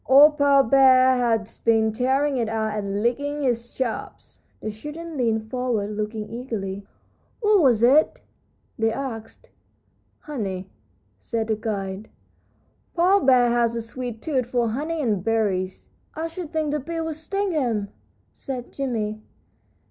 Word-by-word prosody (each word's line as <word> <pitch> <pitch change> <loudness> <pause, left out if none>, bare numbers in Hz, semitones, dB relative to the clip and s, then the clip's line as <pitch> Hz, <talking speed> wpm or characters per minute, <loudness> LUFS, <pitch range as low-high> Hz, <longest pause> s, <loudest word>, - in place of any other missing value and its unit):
Old 295 +3 +7
Paw 280 -1 +5
Bear 260 +1 +6
has 225 -3 0
been 220 -1 +3
tearing 265 +5 +1
it 230 -3 0
out 220 -1 -1
and 200 0 -2
licking 285 +5 -1
his 240 -2 -1
chops." 255 -4 -5 0.2
The 215 - -4
children 300 +9 -8
leaned 220 -4 -1
forward, 245 -5 -1
looking 215 0 -4
eagerly. 205 -5 -5 0.5
"What 420 -4 +4
was 240 -6 +4
it?" 280 +6 +4 0.6
they 225 0 +2
asked. 225 -3 -7 0.7
"Honey," 195 -10 -5 0.5
said 225 - -3
the 220 - +2
guide. 205 -2 -4 0.9
"Paw 365 +4 +4
Bear 250 -6 +4
has 235 -1 +2
a 230 - -2
sweet 240 -1 -6
tooth 260 -6 0
for 240 -2 0
honey 305 +7 -2
and 210 -7 0
berries." 200 -4 -1 0.3
"I 320 - -3
should 330 -1 -6
think 310 -2 -1
the 300 - 0
bees 330 +4 -4
would 320 0 -3
sting 390 +6 -2
him," 235 - -1 0.4
said 255 -3 -7
Jimmie. 220 -6 -3
240 Hz, 140 wpm, -24 LUFS, 220-285 Hz, 0.9 s, Old